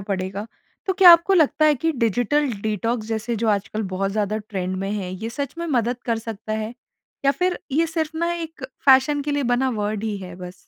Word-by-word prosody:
पड़ेगा। 195 Hz, +1 st, -4 dB, 0.4 s
तो 380 Hz, -, +2 dB
क्या 375 Hz, -2 st, +8 dB
आपको 340 Hz, +3 st, +5 dB
लगता 310 Hz, -2 st, +3 dB
है 305 Hz, -1 st, +5 dB
कि 325 Hz, +5 st, -1 dB
डिजिटल 245 Hz, +6 st, +1 dB, 0.2 s
डिटॉक्स 220 Hz, +1 st, -1 dB
जैसे 225 Hz, +1 st, -2 dB
जो 225 Hz, +1 st, 0 dB
आजकल 210 Hz, +1 st, 0 dB
बहुत 195 Hz, +1 st, -1 dB
ज़्यादा 215 Hz, 0 st, -1 dB
ट्रेंड 185 Hz, -2 st, -3 dB
में 195 Hz, +1 st, -3 dB
है, 195 Hz, -3 st, -3 dB
ये 220 Hz, +5 st, -5 dB
सच 280 Hz, +1 st, -4 dB
में 340 Hz, -, -3 dB
मदद 245 Hz, -5 st, 0 dB
कर 230 Hz, -1 st, +1 dB
सकता 220 Hz, -1 st, -6 dB
है? 220 Hz, +2 st, -3 dB, 0.5 s
या 275 Hz, -, +5 dB
फिर 360 Hz, +6 st, 0 dB
ये 325 Hz, +4 st, +3 dB
सिर्फ़ 320 Hz, -1 st, -3 dB
ना 340 Hz, 0 st, 0 dB
एक 325 Hz, -5 st, -6 dB, 0.2 s
फ़ैशन 270 Hz, +2 st, +5 dB
के 295 Hz, -, -3 dB
लिए 285 Hz, -1 st, 0 dB
बना 260 Hz, +2 st, +1 dB
वर्ड 210 Hz, -1 st, -2 dB
ही 215 Hz, -2 st, -2 dB
है 180 Hz, -2 st, -8 dB
बस? 180 Hz, -1 st, -8 dB
230 Hz, 215 wpm, -22 LUFS, 210-295 Hz, 0.5 s, क्या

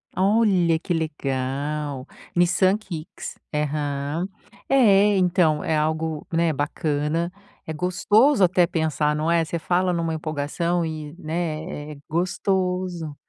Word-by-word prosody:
Olha, 190 Hz, -4 st, +3 dB
que 175 Hz, +2 st, -3 dB
legal. 145 Hz, -2 st, -2 dB, 0.3 s
Nissan 185 Hz, +3 st, +3 dB
Kicks. 175 Hz, -7 st, -8 dB, 0.2 s
Aham, 150 Hz, +2 st, -2 dB, 0.4 s
é, 210 Hz, -6 st, +5 dB
então 175 Hz, -4 st, +2 dB
é 160 Hz, -, +1 dB
algo, 155 Hz, 0 st, -1 dB
né, 165 Hz, 0 st, +2 dB
bacana, 150 Hz, +3 st, -1 dB, 0.4 s
é 160 Hz, -, -3 dB
gostoso 205 Hz, -, +3 dB
até 180 Hz, 0 st, +4 dB
pensar, 155 Hz, -3 st, 0 dB
não 155 Hz, +2 st, -1 dB
é, 170 Hz, -1 st, +3 dB
você 170 Hz, -, -3 dB
fala 180 Hz, +2 st, +1 dB
numa 165 Hz, -1 st, -1 dB
empolgação 160 Hz, +3 st, -1 dB
e, 155 Hz, -1 st, -6 dB
né, 155 Hz, -2 st, -4 dB
é -, -, -12 dB
gostoso. 180 Hz, -1 st, -1 dB
165 Hz, 115 wpm, -23 LUFS, 150-180 Hz, 0.4 s, é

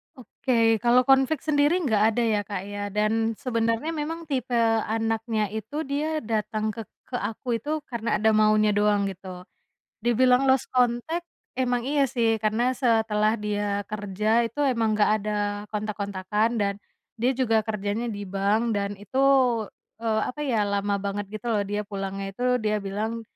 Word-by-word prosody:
Oke, 230 Hz, -3 st, +1 dB
kalau 240 Hz, +3 st, +4 dB
konflik 270 Hz, +2 st, +3 dB
sendiri 290 Hz, +1 st, +3 dB
nggak 215 Hz, -6 st, +2 dB
ada 240 Hz, -, +1 dB
ya, 215 Hz, -2 st, +2 dB
Kak, 200 Hz, -3 st, -3 dB
ya, 205 Hz, 0 st, -5 dB
dan 220 Hz, +2 st, 0 dB
sebenarnya 230 Hz, +3 st, -1 dB
memang 325 Hz, +1 st, -4 dB
tipe 255 Hz, -3 st, -1 dB, 0.3 s
anaknya 225 Hz, -1 st, -1 dB
itu 225 Hz, +9 st, -4 dB
dia 300 Hz, +2 st, -2 dB
datang 215 Hz, -1 st, -1 dB
ke 225 Hz, -, -7 dB, 0.3 s
ke 255 Hz, -, -5 dB
aku 225 Hz, +3 st, -5 dB
itu 300 Hz, +6 st, -2 dB
karena 230 Hz, -3 st, -1 dB
ada 220 Hz, +2 st, +3 dB
maunya 215 Hz, 0 st, +4 dB
doang, 205 Hz, 0 st, +2 dB
gitu. 185 Hz, -1 st, -10 dB, 0.6 s
Dibilang 250 Hz, +2 st, +4 dB
lost 265 Hz, -1 st, +2 dB
contact, 250 Hz, +8 st, +1 dB, 0.3 s
emang 245 Hz, -2 st, +1 dB
iya 290 Hz, -1 st, +3 dB
sih, 230 Hz, -3 st, +1 dB
karena 230 Hz, +4 st, +2 dB
setelah 220 Hz, -3 st, +2 dB
dia 205 Hz, -1 st, -2 dB
kerja 205 Hz, 0 st, -3 dB, 0.2 s
itu 235 Hz, -, -10 dB
emang 230 Hz, -5 st, +1 dB
nggak 210 Hz, -, +3 dB
ada 210 Hz, +1 st, -3 dB, 0.4 s
kontak-kontakan, 210 Hz, 0 st, -1 dB
dan 200 Hz, 0 st, +1 dB, 0.5 s
dia 245 Hz, +3 st, +2 dB
juga 230 Hz, -3 st, +2 dB
kerjanya 210 Hz, +2 st, -2 dB
di 205 Hz, -2 st, -5 dB
bank, 200 Hz, +5 st, 0 dB
dan 200 Hz, 0 st, -2 dB
itu, 210 Hz, +6 st, -4 dB, 0.8 s
eee, 220 Hz, -1 st, +1 dB
apa 275 Hz, -, -8 dB
ya, 230 Hz, -7 st, +1 dB
lama 200 Hz, 0 st, 0 dB
banget, 200 Hz, 0 st, -2 dB
gitu -, -, -18 dB
loh, 210 Hz, -2 st, +2 dB
dia 205 Hz, +1 st, -1 dB
pulangnya 195 Hz, -1 st, -4 dB
itu 245 Hz, +6 st, -6 dB, 0.2 s
dia 215 Hz, 0 st, +1 dB
bilang 215 Hz, +4 st, -3 dB
220 Hz, 155 wpm, -25 LUFS, 205-245 Hz, 0.8 s, kalau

